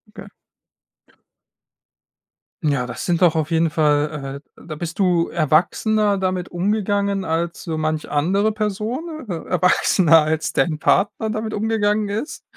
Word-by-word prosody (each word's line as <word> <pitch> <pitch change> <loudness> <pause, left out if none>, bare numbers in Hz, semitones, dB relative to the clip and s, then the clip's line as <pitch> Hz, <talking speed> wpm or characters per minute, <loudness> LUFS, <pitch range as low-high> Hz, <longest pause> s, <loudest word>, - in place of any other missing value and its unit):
Okay. - - -10 2.4
Ja. 140 -5 0
das - - -6
sind 175 -1 0
doch 170 -3 +4
auf 155 +1 -1
jeden 165 0 +2
Fall, 150 -3 0 0.2
äh - - -16
da 155 - -6
bist 170 +2 -6
du 180 -4 +2
erwachsener 195 +6 +1
damit 185 -1 -2
umgegangen 200 +1 0
als 170 0 -2
so 160 -2 -4
manch 155 0 -2
andere 190 +9 +1
Person, 225 - -4
äh - - -1
erwachsener 175 -2 +4
als 160 0 -1
dein 155 -3 0
Partner 215 +6 +1
damit 215 0 -3
umgegangen 210 -1 0
ist. 220 +9 -5
180 Hz, 135 wpm, -21 LUFS, 155-210 Hz, 2.4 s, doch